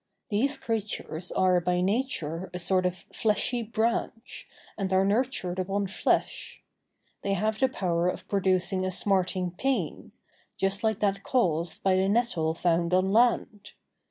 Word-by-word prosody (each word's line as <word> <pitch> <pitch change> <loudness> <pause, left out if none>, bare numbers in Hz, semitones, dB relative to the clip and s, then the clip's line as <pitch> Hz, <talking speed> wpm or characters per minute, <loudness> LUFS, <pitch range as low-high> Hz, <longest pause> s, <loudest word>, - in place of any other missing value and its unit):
These 270 +7 +1
creatures 210 -8 -3
are 185 -1 +3
by 180 +1 0
nature 190 - -1
a - - -1
sort 185 +1 +2
of 180 +1 -6
fleshy 225 +3 +1
branch, 225 +1 -2 0.3
and 195 -2 -3
are 190 +1 +3
nurtured 200 -4 0
upon 195 +2 -1
flesh. 190 - -1 0.6
They 200 - -1
have 215 +3 0
the 265 - +3
power 175 -7 0
of - - -6
producing 185 -1 +1
a 185 - 0
smarting 185 -1 0
pain, 265 +9 -2 0.5
just 195 +3 0
like 220 -1 0
that 195 -1 +1
caused 170 -10 0
by 190 -1 +3
the 190 +1 +2
nettle 200 -8 +1
found 170 +1 +1
on 190 +1 +2
land. 220 -3 +1
195 Hz, 145 wpm, -27 LUFS, 180-220 Hz, 0.6 s, are